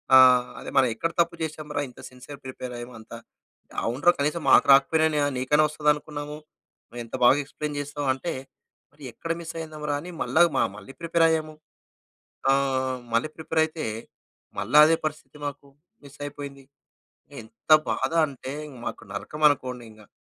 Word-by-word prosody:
ఆహ్, 125 -1 +7
అదే - - -7
మనం 135 -1 +6
ఎక్కడ 165 +8 -2
తప్పు 170 0 +2
చేసాం 155 -1 -4
రా? 145 - +1
ఇంత 125 - -17
సిన్సియర్‌ 125 +3 -12
ప్రిపేర్ 130 -1 -7
అయ్యాము 120 +1 -8
అంతా. 110 +1 -10 0.7
"అవునురా 135 +9 +3
కనీసం 150 +4 0
మాకు - - +7
రాకపోయినా 150 +2 +3
నీకైనా 150 +4 +3
వస్తదనుకున్నాము. 150 0 -1 0.5
నువ్వెంత 120 0 -7
బాగా 120 +3 +7
ఎక్స్‌ప్లైన్‌ 150 +1 -5
చేసావు" 145 0 -4
అంటే, 135 +6 -4 0.6
మరి 150 - -17
ఎక్కడ 165 - -5
మిస్ 165 0 -7
అయిందంరా 155 -2 -4
అని 180 +3 -8
మళ్ళా 160 - +2 0.2
మా - - +4
మళ్ళీ 105 +6 -11
ప్రిపేర్ 165 0 +3
అయ్యాము. 155 -1 -1 1.0
ఆహ్, 130 -1 +1 0.2
మళ్ళి 115 +7 +1
ప్రిపేర్ 160 0 0
అయితే, 160 0 -6 0.7
మళ్ళా 120 +9 +4
అదే 165 +1 +3
పరిస్థితి 155 0 -5
మాకు. 145 0 -6 0.4
మిస్ 140 0 -15
అయిపోయింది. 140 -1 -8 0.8
ఎంత 110 +7 -3 0.2
బాధ 130 +4 -1
అంటే 135 -2 -8 0.3
మాకు - - -5
నరకమనుకోండి 130 +1 0
ఇంకా. 110 -1 -17
145 Hz, 145 wpm, -25 LUFS, 130-155 Hz, 1.0 s, ఆహ్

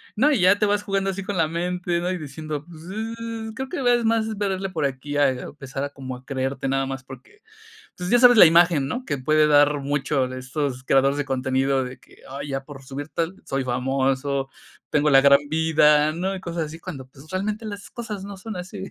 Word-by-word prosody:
no, 280 +8 +4
y 260 -9 +2
ya 185 +3 +5
te 210 - +3
vas 205 0 +1
jugando 195 -1 -1
así 195 +1 -4
con 200 +1 -4
la 165 -2 +3
mente, 175 +1 -2
¿no?, 175 +1 -1
y 185 - -2
diciendo, 150 0 -6
pues 165 -2 -13
sí, 225 +1 -5
creo 265 +2 -5
que 350 - -4 0.2
es 240 -1 -1
más 220 -1 +1
verle 195 -1 -2
por 160 -5 -2
aquí 140 +2 -3
a 145 -1 +5
empezar 135 +1 -6
a 145 - -2
como 130 -2 -7
a 125 +1 -14
creerte 135 0 -3
nada 135 0 +1
más 135 0 -5
porque, 135 - -14 0.5
pues, 180 0 -5
ya 245 - +5
sabes 245 -1 +7
la 210 - +11
imagen, 165 -4 +4
¿no?, 250 - -4
que 145 - -2
puede 155 +4 +3
dar 145 0 +4
mucho 140 -1 0
de 130 0 -6
estos 130 0 -3
creadores 135 +1 +3
de 145 - -1
contenido 135 0 0
de 125 0 -8
que: - - -21
"Ay, 140 +2 -6
ya 135 0 -3
por 135 -1 -11
subir 140 +3 -7
tal, 165 +4 -2
soy 135 0 -2
famoso, 135 +2 -1 0.4
tengo 150 0 +2
la 135 0 +7
gran 140 0 +7
vida", 155 -1 +4
¿no?, 185 +4 -2
y - - -6
cosas 170 -2 -3
así 155 +2 -9
cuando, 135 -5 -8
pues, 135 +3 -17
realmente 210 +4 -3
las 205 -1 -7
cosas 215 -5 -6
no 200 0 -8
son 215 +2 -7
así. 190 +2 -6
150 Hz, 225 wpm, -23 LUFS, 135-195 Hz, 0.5 s, la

